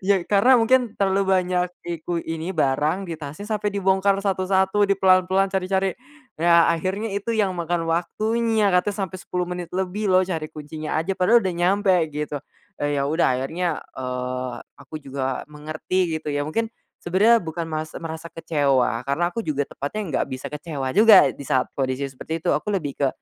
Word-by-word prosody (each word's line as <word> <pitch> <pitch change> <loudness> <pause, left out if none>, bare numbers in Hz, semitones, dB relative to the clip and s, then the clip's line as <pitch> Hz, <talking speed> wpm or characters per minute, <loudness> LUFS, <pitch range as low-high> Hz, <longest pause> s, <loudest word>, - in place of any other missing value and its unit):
Ya, 200 0 +4
karena 210 +6 +5
mungkin 240 0 +3
terlalu 195 0 +2
banyak 180 -1 +1 0.2
iku 170 0 -3
ini 165 +3 -4
barang 155 +5 0
di 165 - -4
tasnya 155 +7 -8
sampe 210 -1 -2
dibongkar 195 0 +2
satu-satu 190 +1 +2
di 200 - +3
pelan-pelan, 190 0 +3
cari-cari. 190 0 0 0.4
Ya 170 0 +5
akhirnya 190 +6 -2
itu 200 +3 -2
yang 210 -3 +2
makan 170 0 -1
waktunya, 215 +6 +1
katanya 180 +3 +2
sampai 185 0 -8
10 180 0 -3
menit 180 -1 -6
lebih 190 +3 -2
loh 185 - +5
cari 165 -4 -3
kuncinya 155 0 -6
aja 190 +4 -2
padahal 225 +6 +5
udah 190 - 0
nyampe 190 +4 +2 0.2
gitu, 150 0 -3 0.4
eee, 145 0 -1
ya - - +1
udah 160 +3 +2
akhirnya, 165 +7 -2 0.2
eee, 125 0 -3 0.2
aku - - -14
juga 135 -1 -3
mengerti 155 +4 -2
gitu 155 -1 -4
ya, 145 0 -1
mungkin 225 +8 -2 0.3
sebenarnya 210 +6 +4
bukan 165 0 -4
mas 155 -1 -4
merasa 165 0 -7
kecewa, 140 -8 +1
karena 140 +6 -1
aku 230 - -2
juga 145 -6 -1
tepatnya 160 +1 -3
gak - - -2
bisa 130 0 -5
kecewa 145 -3 -4
juga 210 0 +8
di - - -9
saat 130 -1 +1
kondisi 135 0 -1
seperti 135 +5 -5
itu 165 - +1
aku 210 - -2
lebih 155 -9 -2
ke 140 - +4
175 Hz, 175 wpm, -23 LUFS, 150-195 Hz, 0.4 s, juga